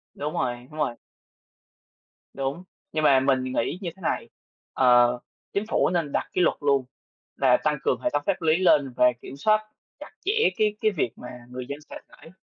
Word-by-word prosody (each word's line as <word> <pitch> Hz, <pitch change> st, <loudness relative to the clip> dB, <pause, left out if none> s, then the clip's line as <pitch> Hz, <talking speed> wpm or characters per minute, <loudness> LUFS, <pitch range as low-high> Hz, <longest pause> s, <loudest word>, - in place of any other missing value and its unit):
Đúng 150 Hz, +1 st, -4 dB
rồi, 120 Hz, 0 st, -2 dB
đúng 155 Hz, -, -10 dB
rồi. 120 Hz, -5 st, 0 dB, 1.4 s
Đúng. 135 Hz, +6 st, -3 dB, 0.3 s
Nhưng 155 Hz, 0 st, -1 dB
mà 135 Hz, -3 st, +6 dB
mình 130 Hz, -1 st, +2 dB
nghĩ 130 Hz, +5 st, -1 dB
như 175 Hz, -, -3 dB
thế 190 Hz, -, -19 dB
này, -, -, -2 dB, 0.4 s
ờ, 125 Hz, -1 st, +4 dB, 0.3 s
chính 200 Hz, -, 0 dB
phủ -, -, +2 dB
nên 170 Hz, -5 st, -1 dB
đặt -, -, -1 dB
cái 180 Hz, -, +2 dB
luật -, -, +3 dB
luôn 140 Hz, -3 st, +2 dB, 0.5 s
là 130 Hz, -2 st, +4 dB
tăng 150 Hz, -1 st, +1 dB
cường -, -, 0 dB
hệ 205 Hz, -, +1 dB
thống 145 Hz, -, +1 dB
pháp 190 Hz, -3 st, 0 dB
lý 160 Hz, 0 st, +3 dB
lên 145 Hz, -8 st, +3 dB
và 125 Hz, -, +4 dB, 0.2 s
kiểm 135 Hz, -, -9 dB
soát 215 Hz, +6 st, +3 dB, 0.4 s
chặt -, -, -10 dB
chẽ 445 Hz, +3 st, +3 dB
cái 210 Hz, -1 st, +2 dB
cái 215 Hz, -1 st, +3 dB
việc 150 Hz, -10 st, -1 dB
mà 125 Hz, -, -10 dB, 0.2 s
người 125 Hz, 0 st, -6 dB
dân 145 Hz, +2 st, -5 dB
sẽ -, -, -10 dB
phải 160 Hz, -, -16 dB
145 Hz, 200 wpm, -25 LUFS, 130-175 Hz, 1.4 s, mà